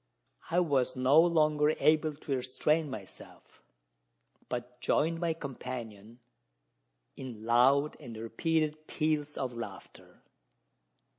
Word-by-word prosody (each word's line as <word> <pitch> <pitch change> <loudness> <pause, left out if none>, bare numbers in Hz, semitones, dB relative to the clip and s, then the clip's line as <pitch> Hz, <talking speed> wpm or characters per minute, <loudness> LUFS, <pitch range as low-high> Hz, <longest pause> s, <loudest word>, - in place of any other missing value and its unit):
I 175 - +2
was 135 -6 +1
no 130 +5 +5
longer 155 -3 +3
able 155 -1 +3
to 140 -1 -3
restrain 145 +5 0
myself, 105 -8 -11 0.9
but 125 0 -6
joined 165 +2 +1
my 165 -2 0
companion 120 -6 -7 1.0
in 120 -5 -8
loud 135 +5 +4
and 120 -7 -9
repeated 155 +6 -1
peals 150 -2 -1
of 130 -2 -3
laughter. 110 -5 -10
140 Hz, 100 wpm, -31 LUFS, 120-155 Hz, 1.0 s, no